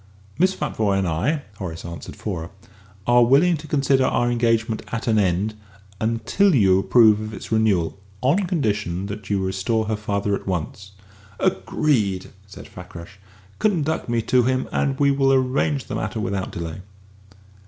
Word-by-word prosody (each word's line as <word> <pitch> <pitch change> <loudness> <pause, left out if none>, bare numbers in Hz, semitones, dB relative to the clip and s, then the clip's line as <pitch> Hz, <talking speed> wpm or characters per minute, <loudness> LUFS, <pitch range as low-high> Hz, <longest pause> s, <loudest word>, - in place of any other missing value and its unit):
"Miss 185 +2 +3
Futvoye 100 -3 0
and 95 -1 0
I," 125 - 0
Horace 85 -5 -6
answered 85 -1 -8
for 95 -6 -4
her, 80 - -7 0.6
"are 120 0 +5
willing 145 +9 +4
to 155 +1 -10
consider 140 -2 +2
our 120 -1 +1
engagement 115 -2 +1
at 115 - -4
an 110 -2 +2
end, 95 +2 +1 0.5
until 115 - +2
you 95 -5 +4
approve 110 0 +5
of 110 0 -6
its - - -9
renewal, 100 -5 +1 0.2
on 165 +10 +1
condition 105 - -1
that 100 0 -7
you 100 -2 0
restore 95 +4 -1
her 110 0 -1
father 100 -1 -2
at 100 - -3
once." 95 +2 -4 0.5
"Agreed!" 100 -1 0 0.2
said 100 - -11
Fakrash. 90 +1 -11 0.4
"Conduct 160 - 0
me 115 -1 0
to 125 +2 +3
him, 130 +1 0
and 135 -2 0
we 140 -1 +4
will 135 -1 +2
arrange 135 +2 +1
the - - -7
matter 110 - -3
without 100 -2 -2
delay." 85 +1 -6
110 Hz, 160 wpm, -22 LUFS, 95-130 Hz, 0.6 s, are